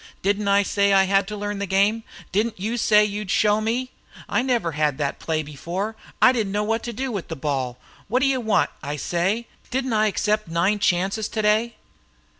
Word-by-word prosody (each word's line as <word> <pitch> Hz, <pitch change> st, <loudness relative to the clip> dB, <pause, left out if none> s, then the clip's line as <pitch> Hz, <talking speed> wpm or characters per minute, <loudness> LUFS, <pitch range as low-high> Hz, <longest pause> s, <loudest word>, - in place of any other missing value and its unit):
"Didn't 200 Hz, +1 st, +1 dB
I 200 Hz, 0 st, +4 dB
say 200 Hz, +1 st, +2 dB
I 195 Hz, 0 st, +6 dB
had 195 Hz, 0 st, +2 dB
to 210 Hz, 0 st, -5 dB
learn 205 Hz, 0 st, -3 dB
the 200 Hz, -, -2 dB
game? 200 Hz, +4 st, +2 dB, 0.3 s
Didn't 215 Hz, +1 st, 0 dB
you 220 Hz, +5 st, -2 dB
say 210 Hz, -2 st, +4 dB
you'd 210 Hz, -1 st, -4 dB
show 210 Hz, +2 st, +3 dB
me? 245 Hz, +4 st, -1 dB, 0.4 s
I -, -, +1 dB
never 240 Hz, -9 st, 0 dB
had 150 Hz, -2 st, 0 dB
that 145 Hz, -2 st, -2 dB
play 160 Hz, -1 st, -1 dB
before. 175 Hz, +9 st, -4 dB, 0.2 s
I 255 Hz, -, +7 dB
didn't 220 Hz, -6 st, -1 dB
know 205 Hz, +1 st, 0 dB
what 225 Hz, +2 st, 0 dB
to 240 Hz, -, -3 dB
do 260 Hz, +3 st, -3 dB
with 200 Hz, -6 st, -4 dB
the 165 Hz, -, -5 dB
ball. 135 Hz, -4 st, -2 dB, 0.3 s
What 250 Hz, +5 st, +1 dB
d' -, -, +5 dB
you 270 Hz, -2 st, +1 dB
want, 220 Hz, -2 st, +2 dB
I 145 Hz, 0 st, -4 dB
say? 185 Hz, +9 st, -1 dB, 0.2 s
Didn't 260 Hz, -1 st, -1 dB
I 215 Hz, 0 st, +3 dB
accept 215 Hz, 0 st, 0 dB
nine 175 Hz, +6 st, +1 dB
chances 195 Hz, +4 st, +1 dB
today?" 215 Hz, +2 st, +1 dB
205 Hz, 205 wpm, -23 LUFS, 185-220 Hz, 0.4 s, I